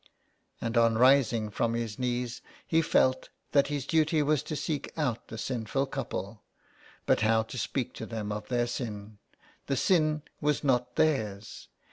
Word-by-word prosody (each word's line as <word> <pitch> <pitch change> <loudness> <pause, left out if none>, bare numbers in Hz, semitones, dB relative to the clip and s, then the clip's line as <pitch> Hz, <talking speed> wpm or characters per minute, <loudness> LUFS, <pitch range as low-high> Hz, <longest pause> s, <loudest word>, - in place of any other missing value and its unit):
And 115 +1 -2
on 115 -1 +4
rising 120 -4 +4
from 115 +3 0
his 115 -2 -3
knees 125 -1 -2 0.2
he 165 0 +3
felt 130 -4 +2 0.2
that 140 -1 +4
his 145 -3 -3
duty 155 0 +2
was 150 -1 +2
to 155 - -5
seek 150 0 -3
out 125 -7 -1
the 110 - -8
sinful 125 +3 -1
couple. 105 -6 -5 0.6
But - - +3
how 110 +1 +3
to 110 - -9
speak 125 +3 -2
to - - -6
them 110 -3 -4
of 105 0 -5
their 120 -1 +1
sin? 105 -4 -6 0.5
The 135 - 0
sin 155 -2 +2 0.2
was 150 0 +1
not 125 -3 +1
their's. 110 -10 -1
125 Hz, 160 wpm, -29 LUFS, 110-140 Hz, 0.6 s, on